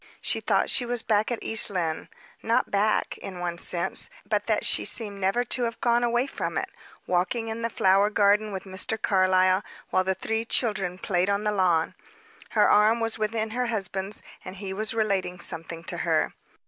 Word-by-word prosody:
She - - -1
thought - - +1
she 250 - +3
was 240 -1 -3
back 215 -1 +1
at 240 - 0
East 225 - +1
Lynne 170 -5 -3 0.3
not 230 +1 +1
back, 210 +2 +1
in 185 -2 -8
one 175 -1 -3
sense, 170 0 +2 0.2
but - - -1
that - - +1
she - - +2
seemed 205 -4 -2
never 195 +6 +1
to 245 +1 -1
have 230 0 -4
gone 240 0 +2
away 240 +1 +2
from - - -4
it - - -3 0.3
walking 185 +6 0
in 225 +1 -4
the 230 - -1
flower 200 -1 +3
garden 210 0 +3
with 190 -1 -5
Mr. 195 +3 -3
Carlyle, 185 -1 +3 0.3
while 185 - +3
the 190 0 0
three 225 +4 -2
children 195 -6 -1
played 185 0 0
on 200 +1 0
the 210 - +1
lawn. 180 -5 +1 0.6
Her - - +6
arm 215 +3 +4
was 225 -1 -2
within 215 0 -1
her 250 +2 -1
husband's, 195 -2 0 0.2
and 185 0 -8
he 195 -1 -6
was 215 +3 -1
relating 195 -5 0
something 165 0 -5
to - - -4
her. - - 0
205 Hz, 190 wpm, -26 LUFS, 185-225 Hz, 0.6 s, Her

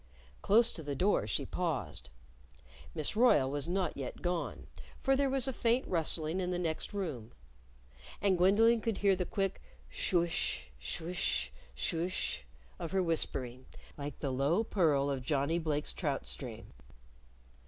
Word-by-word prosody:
Close 230 +3 +5
to - - -5
the 145 -2 -4
door 195 +8 +2
she - - -1
paused. 155 - -3 0.9
Miss 155 +6 -1
Royle 215 - +5
was 145 +1 -2
not 180 -1 0
yet 135 -3 -6
gone, 175 -1 -2 0.3
for 270 0 +2
there 275 0 +2
was 270 -1 +3
a 265 - -1
faint 235 +2 +1
rustling 165 0 0
in 180 -1 -1
the 180 - -1
next 165 -3 -2
room. 150 - -4 0.9
And 195 -2 +3
Gwendolyn 220 +6 +5
could 225 -3 -1
hear 200 -1 +3
the 180 -1 -2
quick 195 -2 -1 0.3
shoo 170 - +2
ish, 65 - -2
shoo 70 - -4
ish, 180 - -1 0.2
shoo 160 - -1
ish 185 - -3 0.3
of 165 - -5
her 190 -1 +3
whispering, 130 -6 -1 0.3
like 145 -1 -6
the 140 - -2
low 140 - +2
purl 155 -10 +2
of 135 -2 -2
Johnnie 145 +4 0
Blake's 150 -2 -1
trout 145 -6 -2
stream. 115 - -5
165 Hz, 155 wpm, -33 LUFS, 140-195 Hz, 0.9 s, Close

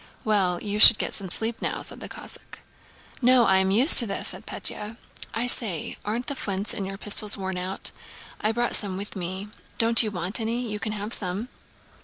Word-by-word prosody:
"Well, 190 -5 +1
you 210 0 -2
should 220 0 +11
get - - -2
some 195 -3 -4
sleep 225 +5 -2
now," - - -3
said - - -10
the - - -8
Cossack. - - -8 0.6
"No, 250 -1 +4
I 190 - +3
am 190 0 +2
used 240 - +7
to 235 - +1
this," 195 - +1
said - - -4
Pétya. 215 +2 -4 0.3
"I 230 +2 -2
say, 215 -9 0
aren't 230 +4 -3
the 285 - -3
flints 200 -5 -1
in 195 - -4
your 195 0 -7
pistols 210 +1 +1
worn 190 -1 -4
out? 185 +2 -2 0.5
I 215 - +1
brought 240 +1 -2
some 195 -3 -2
with 200 +2 -7
me. 190 +2 -6 0.3
Don't 230 0 +5
you 220 - -1
want 185 +2 -1
any? 230 +2 -2
You 210 -1 -5
can 215 0 -4
have 210 +2 -3
some." 200 +5 -3
210 Hz, 205 wpm, -24 LUFS, 190-225 Hz, 0.6 s, should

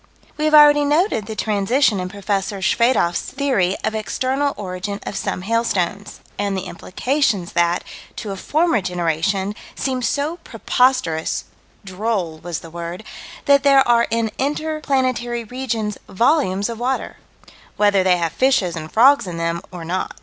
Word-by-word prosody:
We 305 - -2
have 310 0 +4
already 295 -1 +7
noted 295 - +1
the 220 - -5
transition 215 +2 +1
in 180 0 -3
Prof. 200 0 -12
Schwedoffs 195 0 +1
theory 255 -10 0
of - - -1
external 260 +6 -1
origin 195 0 -5
of - - -6
some 185 - -3
hailstones 205 -3 -1 0.2
and 200 -1 -1
the 185 - -3
implications 205 - -1
that, 175 0 +1 0.3
to 210 - -5
a - - -4
former 310 - +1
generation, 180 +3 -1 0.2
seemed 260 -2 -2
so 290 +8 -1
preposterous 250 - 0 0.4
"droll" 190 -4 -2
was 175 -1 -5
the 165 - -11
word 170 +3 -6 0.4
that 280 -1 +5
there 275 -1 +5
are 235 -1 +4
in 230 -1 0
inter 310 +3 -1
planetary 255 -4 0
regions 225 -3 -3
volumes 205 - +2
of 230 -1 -6
water 260 +2 -2 0.6
whether 205 -2 +3
they 185 -1 +3
have 165 -2 -2
fishes 235 -10 +2
and 155 -1 -7
frogs 240 - +5
in 170 -2 -5
them 170 0 -2
or 175 -3 -8
not. 185 +3 -3
210 Hz, 150 wpm, -20 LUFS, 185-260 Hz, 0.6 s, already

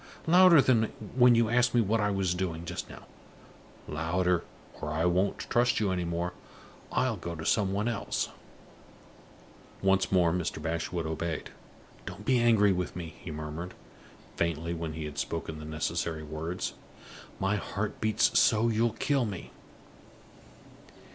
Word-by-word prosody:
Louder 175 -2 +7
than 115 -4 +4 0.3
when 125 -1 +7
you 115 -1 +3
asked 120 +1 +2
me 120 - +5
what 110 +1 +1
I 105 - +2
was 95 -3 0
doing, 85 -2 -3
just - - -5
now; - - -11 0.8
louder, 85 +3 0 0.4
or 75 - -3
I 80 +2 0
won't 90 +3 +2
trust 120 0 +2
you 105 -3 +1
any 90 -1 -1
more; 85 +1 -2 0.6
I'll 130 -4 +1
go 85 -1 -5
to 80 0 -7
somebody 105 +3 +1
else!" 110 - -2 1.5
Once 95 0 +3
more 90 -3 +4
Mr. 90 -3 -2
Bashwood 80 +1 -2
obeyed. 80 +1 -3 0.6
"Don't - - -8
be 130 -2 +3
angry 110 -4 +5
with 90 -1 -3
me," 85 -2 -6
he - - -6
murmured, 80 +3 -6 0.6
faintly, 85 0 -1
when 80 -2 -4
he 80 0 -5
had 75 -1 -6
spoken 80 -1 -4
the 75 - -8
necessary 80 +1 -2
words. 80 +4 -4 0.7
"My 95 +2 +1
heart 105 +1 -4
beats 110 -1 +3
so 115 +1 +4
you'll 115 0 +1
kill 135 +2 +1
me!" 100 -5 -6
90 Hz, 150 wpm, -29 LUFS, 80-110 Hz, 1.5 s, Louder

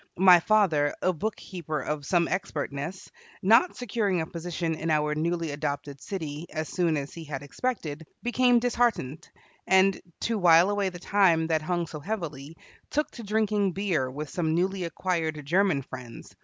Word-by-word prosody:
My 180 -1 +8
father, 165 -7 +2
a 185 - +3
bookkeeper 175 -4 -4
of 145 +1 -4
some 175 -2 +2
expertness, 160 -2 -4 0.3
not 230 - +5
securing 210 -6 -1
a 160 - -1
position 170 0 -3
in 160 +1 -3
our 150 -1 +2
newly 165 +1 -1
adopted 145 -1 -4
city 160 -4 -5
as 155 0 -4
soon 170 -4 +1
as 140 0 -5
he 165 - -8
had 145 -3 -6
expected, 160 - -4 0.2
became 245 0 +3
disheartened, 235 - 0 0.4
and, 190 +1 +4 0.2
to 230 -2 0
while 175 +1 +6
away 205 -2 0
the 180 - -9
time 175 -3 +3
that 160 -1 +2
hung 175 +2 -1
so 155 -1 -8
heavily, 160 -5 -5 0.3
took 300 +1 -1
to 240 - -9
drinking 210 -2 +1
beer 175 -10 0
with 145 +2 -6
some 160 -3 0
newly 185 +1 0
acquired 165 -4 -2
German 175 -3 +2
friends. 125 -2 -10
170 Hz, 160 wpm, -27 LUFS, 150-195 Hz, 0.4 s, My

